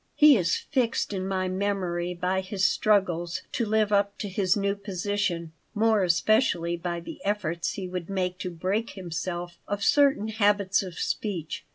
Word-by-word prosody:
He 300 Hz, -2 st, +8 dB
is 175 Hz, -6 st, +2 dB
fixed 245 Hz, -6 st, -1 dB
in 190 Hz, -1 st, -2 dB
my 190 Hz, -1 st, -1 dB
memory 185 Hz, -2 st, -1 dB
by 180 Hz, +2 st, 0 dB
his 190 Hz, 0 st, -1 dB
struggles 180 Hz, -5 st, +1 dB
to 235 Hz, -, -1 dB
live 215 Hz, 0 st, +2 dB
up 200 Hz, 0 st, +2 dB
to 205 Hz, -, -4 dB
his 190 Hz, +1 st, +1 dB
new 200 Hz, 0 st, +1 dB
position, 195 Hz, -4 st, -2 dB, 0.2 s
more 220 Hz, 0 st, +3 dB
especially 175 Hz, -1 st, +2 dB
by 170 Hz, 0 st, -4 dB
the -, -, -9 dB
efforts 175 Hz, -5 st, -1 dB
he 190 Hz, -3 st, -5 dB
would 180 Hz, -1 st, -5 dB
make 185 Hz, -2 st, -2 dB
to 185 Hz, -, -3 dB
break 190 Hz, +7 st, -2 dB
himself 175 Hz, -1 st, -5 dB
of 205 Hz, 0 st, -2 dB
certain 275 Hz, -6 st, +3 dB
habits 205 Hz, -2 st, +2 dB
of 185 Hz, -3 st, -8 dB
speech. 175 Hz, -7 st, -3 dB
190 Hz, 165 wpm, -27 LUFS, 175-205 Hz, 0.2 s, He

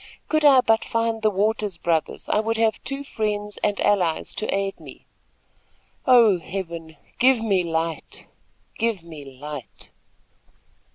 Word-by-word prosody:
"Could 310 Hz, -1 st, +1 dB
I 275 Hz, -3 st, +7 dB
but 225 Hz, -2 st, +2 dB
find 230 Hz, -1 st, -1 dB
the 215 Hz, -, +3 dB
Waters 210 Hz, -1 st, 0 dB
brothers, 165 Hz, -2 st, -1 dB
I -, -, +2 dB
would 225 Hz, +1 st, -1 dB
have 225 Hz, -1 st, +1 dB
two 275 Hz, +1 st, -4 dB
friends 210 Hz, -4 st, -3 dB
and 205 Hz, -1 st, +1 dB
allies 180 Hz, -6 st, +1 dB
to 215 Hz, -, -3 dB
aid 195 Hz, 0 st, -2 dB
me. -, -, -13 dB, 1.0 s
Oh, 230 Hz, -7 st, +6 dB
Heaven, 165 Hz, -3 st, -6 dB, 0.2 s
give 255 Hz, 0 st, +5 dB
me 195 Hz, -5 st, +2 dB
light! 165 Hz, -1 st, -3 dB, 0.5 s
Give 225 Hz, -6 st, 0 dB
me 145 Hz, -5 st, -11 dB
light!" 145 Hz, -3 st, -8 dB
205 Hz, 135 wpm, -23 LUFS, 170-225 Hz, 1.0 s, I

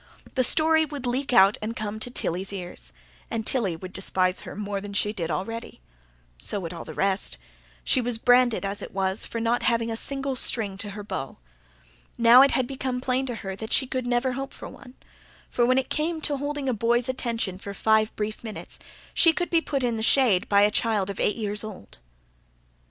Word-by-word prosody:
The 255 Hz, -, +2 dB
story 315 Hz, +4 st, +4 dB
would 290 Hz, -4 st, -5 dB
leak 255 Hz, +3 st, -1 dB
out 195 Hz, -3 st, +6 dB
and 220 Hz, +2 st, -3 dB
come 215 Hz, -2 st, -4 dB
to 245 Hz, -, -4 dB
Tilly's 190 Hz, -5 st, -3 dB
ears; 175 Hz, -, -8 dB, 0.4 s
and 225 Hz, -1 st, -3 dB
Tilly 215 Hz, -10 st, +1 dB
would 185 Hz, +3 st, -9 dB
despise 185 Hz, -1 st, 0 dB
her -, -, -9 dB
more 205 Hz, -1 st, -3 dB
than 200 Hz, 0 st, -7 dB
she 210 Hz, +1 st, 0 dB
did 170 Hz, -6 st, -3 dB
already. 225 Hz, -, -4 dB, 0.6 s
So 130 Hz, -, -2 dB
would 170 Hz, -2 st, -5 dB
all 170 Hz, -, -8 dB
the -, -, -9 dB
rest. 195 Hz, -, 0 dB, 0.5 s
She 255 Hz, -, +2 dB
was 240 Hz, -1 st, +1 dB
branded, 245 Hz, -2 st, +4 dB
as 200 Hz, +1 st, -3 dB
it -, -, -9 dB
was, 190 Hz, 0 st, 0 dB
for 230 Hz, -, -4 dB
not 230 Hz, +2 st, +1 dB
having 230 Hz, -1 st, +1 dB
a -, -, -2 dB
single 275 Hz, +3 st, -1 dB
string 215 Hz, -6 st, 0 dB
to 205 Hz, -, -5 dB
her 205 Hz, -, -6 dB
bow. 135 Hz, -9 st, -5 dB, 0.8 s
Now, 235 Hz, +2 st, +8 dB
it 275 Hz, -, +6 dB
had 260 Hz, -, +1 dB
become 255 Hz, -1 st, -3 dB
plain 260 Hz, +1 st, 0 dB
to 245 Hz, -, -3 dB
her 190 Hz, 0 st, -3 dB
that 220 Hz, +2 st, -7 dB
she 265 Hz, -, +2 dB
could 255 Hz, -1 st, -3 dB
never 245 Hz, +1 st, +1 dB
hope 270 Hz, +2 st, -5 dB
for -, -, -8 dB
one; 260 Hz, -2 st, -14 dB, 0.6 s
for, 240 Hz, -1 st, +2 dB
when 255 Hz, +1 st, +3 dB
it 265 Hz, -, -1 dB
came 320 Hz, +2 st, 0 dB
to 290 Hz, -1 st, -1 dB
holding 285 Hz, 0 st, -3 dB
a 255 Hz, -, +2 dB
boy's 235 Hz, +3 st, +1 dB
attention 230 Hz, -7 st, -2 dB
for 200 Hz, 0 st, -7 dB
five 220 Hz, +1 st, +3 dB
brief 215 Hz, +1 st, -4 dB
minutes, 220 Hz, -2 st, -8 dB, 0.3 s
she 330 Hz, -2 st, +5 dB
could 350 Hz, +2 st, -2 dB
be 335 Hz, -1 st, +4 dB
put 275 Hz, -4 st, -2 dB
in 235 Hz, -2 st, 0 dB
the -, -, -3 dB
shade 225 Hz, -5 st, +3 dB
by 200 Hz, 0 st, +5 dB
a 210 Hz, -, +4 dB
child 210 Hz, -3 st, +1 dB
of 195 Hz, -, -9 dB
eight 205 Hz, -, +1 dB
years 210 Hz, -2 st, -3 dB
old. 210 Hz, -, -10 dB
230 Hz, 210 wpm, -25 LUFS, 200-255 Hz, 0.8 s, Now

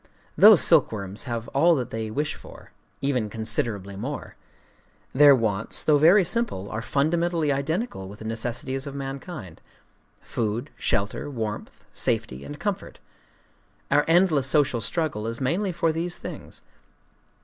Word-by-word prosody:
Those 205 Hz, -6 st, +8 dB
silkworms 110 Hz, -, +2 dB
have 115 Hz, -2 st, -4 dB
all 165 Hz, +5 st, +4 dB
that 125 Hz, -5 st, -3 dB
they 110 Hz, -1 st, -4 dB
wish 150 Hz, +7 st, -2 dB
for,—even 130 Hz, -6 st, -5 dB
considerably 110 Hz, -3 st, -1 dB
more. 130 Hz, +9 st, -6 dB, 0.8 s
Their 145 Hz, +1 st, +7 dB
wants, 110 Hz, -4 st, -1 dB
though 150 Hz, -2 st, +4 dB
very 175 Hz, +7 st, +6 dB
simple, 180 Hz, -, -2 dB
are 110 Hz, -, -3 dB
fundamentally 160 Hz, +5 st, 0 dB
identical 140 Hz, -, -2 dB
with 100 Hz, -, -11 dB
the 110 Hz, -, -10 dB
necessities 125 Hz, +4 st, -4 dB
of 140 Hz, -, -7 dB
mankind,—food, 135 Hz, -, -7 dB
shelter, 100 Hz, +7 st, -1 dB
warmth, 110 Hz, -6 st, -6 dB
safety, 65 Hz, +2 st, -1 dB
and 70 Hz, -, -9 dB
comfort. -, -, -4 dB, 0.9 s
Our 145 Hz, -, +4 dB
endless 165 Hz, -5 st, +3 dB
social 135 Hz, -4 st, +2 dB
struggle 115 Hz, -4 st, -2 dB
is 115 Hz, 0 st, -3 dB
mainly 180 Hz, +9 st, 0 dB
for 165 Hz, -1 st, 0 dB
these 170 Hz, +2 st, -3 dB
things. -, -, -9 dB
135 Hz, 125 wpm, -25 LUFS, 110-160 Hz, 0.9 s, Those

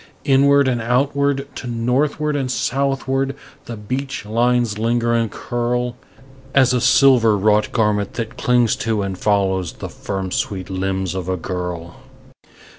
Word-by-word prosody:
Inward 140 Hz, 0 st, +4 dB
and 120 Hz, -2 st, 0 dB
outward 140 Hz, +3 st, 0 dB
to 125 Hz, -, -6 dB
northward 135 Hz, +6 st, 0 dB
and 135 Hz, -3 st, -1 dB
southward 135 Hz, +1 st, -1 dB, 0.3 s
the 115 Hz, -, -7 dB
beach 130 Hz, +4 st, -4 dB
lines 120 Hz, 0 st, +1 dB
linger 115 Hz, +1 st, +1 dB
and 115 Hz, -1 st, +1 dB
curl 120 Hz, +2 st, -2 dB, 0.6 s
As 130 Hz, -2 st, +5 dB
a 125 Hz, -, +1 dB
silver 120 Hz, -7 st, +5 dB
wrought 105 Hz, +1 st, +2 dB
garment 105 Hz, -3 st, 0 dB
that 115 Hz, -2 st, -4 dB
clings 120 Hz, -2 st, +2 dB
to 110 Hz, -2 st, -1 dB
and 95 Hz, -1 st, -3 dB
follows 95 Hz, -3 st, 0 dB
the -, -, -7 dB
firm 95 Hz, -2 st, -5 dB
sweet 95 Hz, -1 st, -3 dB
limbs 95 Hz, -1 st, -2 dB
of 95 Hz, -1 st, -4 dB
a 95 Hz, -, 0 dB
girl. 90 Hz, -1 st, -5 dB
115 Hz, 140 wpm, -20 LUFS, 100-130 Hz, 0.6 s, As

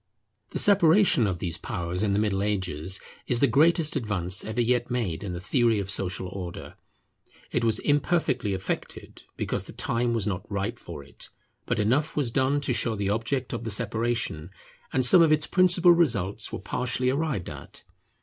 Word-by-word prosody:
The -, -, -5 dB
separation 180 Hz, -, +4 dB
of 90 Hz, -3 st, -2 dB
these 85 Hz, -1 st, -4 dB
powers 90 Hz, +1 st, -4 dB
in 105 Hz, -2 st, +1 dB
the -, -, +1 dB
Middle 105 Hz, -2 st, 0 dB
Ages 95 Hz, -4 st, -1 dB, 0.3 s
is 120 Hz, -, 0 dB
the 140 Hz, -, +5 dB
greatest 155 Hz, +5 st, +3 dB
advance 95 Hz, -4 st, 0 dB
ever 110 Hz, +2 st, -4 dB
yet 120 Hz, 0 st, +1 dB
made 110 Hz, -9 st, -2 dB
in 100 Hz, -, -4 dB
the 90 Hz, -, -5 dB
theory 115 Hz, +5 st, +1 dB
of 100 Hz, -1 st, -2 dB
social 95 Hz, -1 st, -2 dB
Order. 90 Hz, -2 st, -7 dB, 0.8 s
It 120 Hz, -, -1 dB
was 110 Hz, -2 st, +3 dB
imperfectly 145 Hz, -, 0 dB
effected, 95 Hz, -, -6 dB, 0.2 s
because -, -, -3 dB
the -, -, -11 dB
time 120 Hz, 0 st, -1 dB
was 110 Hz, -4 st, -1 dB
not 95 Hz, 0 st, -4 dB
ripe 100 Hz, +4 st, -3 dB
for 75 Hz, -5 st, -9 dB
it; 70 Hz, -, -6 dB, 0.4 s
but 125 Hz, -, 0 dB
enough 130 Hz, +10 st, 0 dB
was 135 Hz, -6 st, 0 dB
done 135 Hz, +3 st, +1 dB
to 135 Hz, -2 st, 0 dB
show 115 Hz, 0 st, 0 dB
the 100 Hz, -1 st, -2 dB
object 120 Hz, +4 st, -2 dB
of 115 Hz, -1 st, -4 dB
the 115 Hz, -, -4 dB
separation, 110 Hz, -6 st, -1 dB, 0.4 s
and 130 Hz, -1 st, +2 dB
some 170 Hz, +7 st, +7 dB
of 160 Hz, -2 st, +4 dB
its 155 Hz, 0 st, +3 dB
principal 180 Hz, -1 st, +5 dB
results 110 Hz, -, +1 dB
were -, -, -4 dB
partially 125 Hz, +4 st, -1 dB
arrived 140 Hz, -, -2 dB
at. -, -, -10 dB
115 Hz, 180 wpm, -26 LUFS, 95-135 Hz, 0.8 s, some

